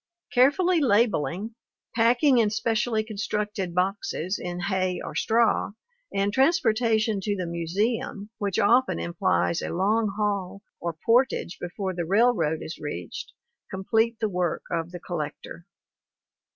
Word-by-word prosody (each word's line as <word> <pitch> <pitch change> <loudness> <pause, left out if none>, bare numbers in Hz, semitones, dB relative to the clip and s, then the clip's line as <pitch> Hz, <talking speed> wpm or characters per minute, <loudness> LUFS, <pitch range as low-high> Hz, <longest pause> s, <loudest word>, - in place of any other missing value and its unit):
Careful 275 +8 +4
labeling, 220 - +1 0.4
packing 240 +3 +4
in 220 -2 +3
specially 220 +1 0
constructed 210 -3 -3
boxes 185 -1 -1
in 175 0 -4
hay 185 -2 0
or - - -6
straw, 225 -2 +2 0.4
and 200 +1 0
transportation 225 - +2
to 205 +1 -1
the 185 -2 -3
museum, 200 +5 -2
which 200 -3 -1
often 240 - +3
implies 85 0 0
a - - -4
long 205 +4 +1
haul 200 -2 -2 0.2
or 170 -2 -4
portage 240 -6 +2
before 185 +2 -4
the 175 -1 -2
railroad 190 -5 +2
is 160 - -7
reached, 90 - -6 0.4
complete 220 +4 0
the 220 - +1
work 180 -4 -1
of 165 -1 -1
the 175 0 -8
collector. 170 0 -6
200 Hz, 125 wpm, -26 LUFS, 175-225 Hz, 0.4 s, Careful